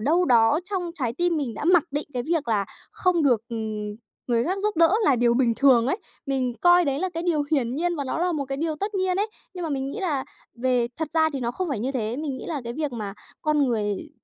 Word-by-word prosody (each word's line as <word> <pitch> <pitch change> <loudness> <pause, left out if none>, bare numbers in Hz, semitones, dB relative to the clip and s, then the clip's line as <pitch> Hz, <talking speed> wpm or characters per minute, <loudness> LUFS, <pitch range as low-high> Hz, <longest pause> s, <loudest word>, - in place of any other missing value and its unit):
đâu 330 +10 +3
đó 240 +4 +4
trong 355 -3 -2
trái 250 -8 -2
tim 350 +4 +1
mình 265 -7 -2
đã 295 - -5
mặc 350 -3 +5
định 295 +2 -2
cái 245 - -1
việc 310 -2 -1
là 205 -3 +2 0.3
không 360 -3 +1
được, 245 -7 +4
ừm, 215 -2 -4 0.3
người 235 -1 +2
khác 370 +4 -1
giúp 420 -5 0
đỡ 335 +2 +5
là 275 - +4
điều 235 0 +3
bình 240 -2 +3
thường 255 -4 +5
ấy. 280 - +1 0.3
Mình 260 -3 0
coi 350 0 +6
đấy 275 -1 0
là 375 - 0
cái 335 - -2
điều 330 -4 +1
hiển 250 -4 +1
nhiên 345 +2 0
và 285 - -2
nó 260 - -2
là 355 0 +1
một 290 -3 -1
cái 270 0 -4
điều 310 0 -1
tất 410 +5 -3
nhiên 375 -1 +1
ấy. 415 +3 +1 0.3
Nhưng 360 - -5
mà 320 - -3
mình 270 -1 -2
nghĩ 420 - -5
là 295 -8 -1 0.4
về 250 -2 +2
thật 320 - -2
ra 315 -1 +4
thì 270 - -3
nó 235 - -1
không 355 +8 -3
phải 265 -7 -2
như 260 +4 -1
thế, 230 -2 -2
mình 290 -2 -3
nghĩ - - -8
là 300 -5 -3
cái 235 - -4
việc 295 0 -3
mà 210 -4 -5 0.3
con 300 -2 +2
người, 210 -5 -2
280 Hz, 265 wpm, -25 LUFS, 240-335 Hz, 0.4 s, coi